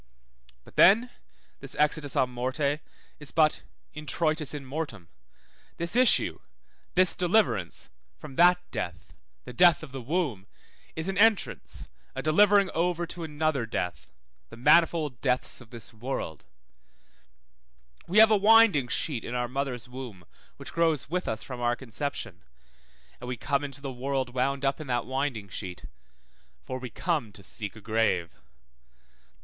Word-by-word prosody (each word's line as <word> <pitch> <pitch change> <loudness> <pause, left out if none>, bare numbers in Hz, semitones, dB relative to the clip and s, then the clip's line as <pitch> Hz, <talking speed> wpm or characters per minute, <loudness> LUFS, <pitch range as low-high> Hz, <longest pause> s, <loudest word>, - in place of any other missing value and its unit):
But - - -19
then 230 +6 +6 0.5
this - - -6
exitus 150 -1 +1
à 130 - +3
morte 130 +4 -1 0.4
is 150 -2 -5
but 155 -1 +2 0.3
introitus 155 0 -1
in 145 -2 -5
mortem; 130 - -5 0.7
this 170 +5 -1
issue, 255 0 +4 0.6
this 185 0 +5
deliverance, 175 - +1 0.3
from 145 -3 -10
that 175 +3 +6
death, - - -5 0.3
the 125 - -8
death 175 +2 +5
of 150 - -9
the 135 -1 -6
womb, 130 - -2 0.5
is 160 +2 -3
an 195 0 -2
entrance, 220 -1 +1 0.3
a 135 - -4
delivering 200 +4 +4
over 175 +1 0
to 170 0 -7
another 150 -5 -1
death, 90 -5 -4 0.4
the 115 - -12
manifold 150 0 +3
deaths 125 -1 -1
of 120 - -15
this 115 -1 -9
world; 110 - -5 1.6
we 185 - -1
have 220 0 +8
a - - +6
winding 205 - +6
sheet 120 0 -2
in 120 - -5
our 120 0 -1
mother's 130 -1 -3
womb 125 -8 -9 0.3
which - - -9
grows 160 -4 +1
with 180 +1 -1
us 110 0 -3
from 125 -2 -7
our 120 0 +1
conception, 120 - -5 0.8
and 125 - -8
we 125 -1 -3
come 140 +3 -1
into 140 -1 -7
the 135 -2 -5
world 130 0 -2
wound 135 +2 0
up 135 +3 0
in 155 - -8
that 120 -2 -1
winding 130 -5 -2
sheet, 90 -1 -7 0.7
for 130 0 -6
we 125 -1 -6
come 150 - -2
to 100 - -13
seek 100 +2 -6
a 110 - -12
grave. 105 -6 0
140 Hz, 150 wpm, -28 LUFS, 120-165 Hz, 1.6 s, have